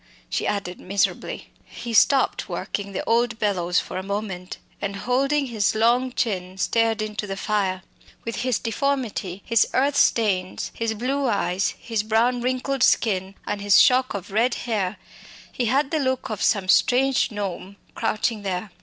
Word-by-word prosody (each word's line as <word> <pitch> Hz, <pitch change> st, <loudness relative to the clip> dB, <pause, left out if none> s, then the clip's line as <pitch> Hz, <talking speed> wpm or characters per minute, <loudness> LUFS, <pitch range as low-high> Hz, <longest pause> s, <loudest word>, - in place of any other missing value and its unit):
she -, -, -1 dB
added 195 Hz, -3 st, -3 dB
miserably. 195 Hz, +1 st, -2 dB
He 235 Hz, -, -8 dB
stopped 265 Hz, +5 st, +3 dB
working 200 Hz, -1 st, -4 dB
the 195 Hz, -, -3 dB
old 235 Hz, 0 st, +1 dB
bellows 180 Hz, -5 st, +1 dB
for 185 Hz, -, -5 dB
a -, -, -6 dB
moment, 195 Hz, -2 st, -4 dB, 0.2 s
and, 200 Hz, -1 st, -3 dB
holding 275 Hz, +7 st, +1 dB
his 220 Hz, -5 st, 0 dB
long 240 Hz, +3 st, +3 dB
chin, 185 Hz, -6 st, -2 dB
stared 225 Hz, +2 st, +1 dB
into 210 Hz, -1 st, -4 dB
the 195 Hz, 0 st, -4 dB
flames. 195 Hz, -3 st, -1 dB, 0.4 s
With 230 Hz, -, -4 dB
his 250 Hz, -2 st, 0 dB
deformity, 225 Hz, -6 st, -2 dB
his 230 Hz, -3 st, +3 dB
earth 280 Hz, +2 st, +2 dB
stains, 190 Hz, -5 st, +1 dB
his 225 Hz, -1 st, -2 dB
blue 265 Hz, +5 st, -1 dB
eyes, 195 Hz, -4 st, 0 dB
his 225 Hz, -3 st, -2 dB
brown 230 Hz, +3 st, +1 dB
wrinkled 255 Hz, +2 st, -1 dB
skin, 195 Hz, -5 st, +2 dB
and 205 Hz, -1 st, -3 dB
his 200 Hz, -2 st, +5 dB
shock 255 Hz, -2 st, +4 dB
of 195 Hz, -1 st, -6 dB
red 235 Hz, +4 st, +2 dB
hair, 210 Hz, -4 st, -1 dB, 0.5 s
he 245 Hz, -, -2 dB
had 270 Hz, +4 st, +1 dB
the 315 Hz, -, +1 dB
look 260 Hz, -4 st, -1 dB
of 215 Hz, -, -4 dB
some 200 Hz, -4 st, +2 dB
strange 255 Hz, +7 st, +3 dB
gnome 200 Hz, -3 st, -5 dB, 0.2 s
crouching 215 Hz, 0 st, -1 dB
there. 190 Hz, 0 st, -3 dB
220 Hz, 160 wpm, -23 LUFS, 195-245 Hz, 0.5 s, his